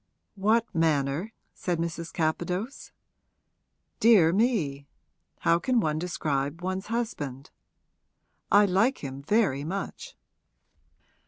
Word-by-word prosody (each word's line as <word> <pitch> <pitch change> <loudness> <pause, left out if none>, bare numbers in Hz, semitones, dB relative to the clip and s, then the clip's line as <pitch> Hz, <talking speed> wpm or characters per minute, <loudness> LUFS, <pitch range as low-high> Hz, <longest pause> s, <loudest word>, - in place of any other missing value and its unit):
'What 215 +3 +2
manner?' 160 +3 +1 0.2
said 175 -2 -2
Mrs. 165 0 -4
Capadose. 180 - -2 1.1
'Dear 195 -8 +6
me, 175 - 0 0.5
how 170 0 +3
can 250 +5 +1
one 155 -6 0
describe 155 -2 -2
one's 185 +1 -3
husband? 150 - -4 1.0
I 205 0 +7
like 200 - +1
him 135 0 -6
very 145 - +1
much.' 195 - -5
175 Hz, 95 wpm, -27 LUFS, 150-215 Hz, 1.1 s, I